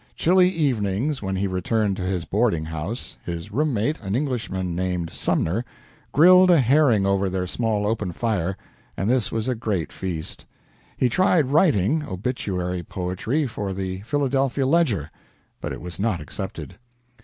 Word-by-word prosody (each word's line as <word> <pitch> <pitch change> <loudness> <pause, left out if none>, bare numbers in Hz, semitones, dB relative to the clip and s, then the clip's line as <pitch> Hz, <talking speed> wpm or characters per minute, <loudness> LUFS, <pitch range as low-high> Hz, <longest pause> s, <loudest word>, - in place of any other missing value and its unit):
Chilly 180 +1 +4
evenings, 135 - 0
when 95 -1 -2
he 95 +1 0
returned 100 +2 0
to - - -4
his 90 -2 -2
boarding 100 -7 +1
house, 80 +9 -5
his 85 +4 -6
room 150 +7 +1
mate, 130 +7 0
an 100 -1 -2
Englishman 115 - -2
named 90 -2 -2
Sumner, 95 +9 0 0.5
grilled 180 +4 +7
a 170 -3 +6
herring 130 -5 +4
over 100 0 +1
their 95 0 -2
small 105 +1 -1
open 105 -3 -1
fire, 95 -2 -1 0.4
and 95 - -1
this 120 -3 +1
was 110 +1 -2
a 130 - +1
great 105 - -2
feast. 85 -4 -6 0.5
He 125 - +3
tried 155 - +2
writing 150 - +3
obituary 95 -5 -3
poetry, 95 - -2
for 105 -5 -4
the 95 0 -4
"Philadelphia 135 +2 0
Ledger" 130 - +2 0.5
but - - -4
it - - -6
was 90 -1 -8
not 100 -4 0
accepted. 95 +4 -7
105 Hz, 155 wpm, -23 LUFS, 95-135 Hz, 0.5 s, grilled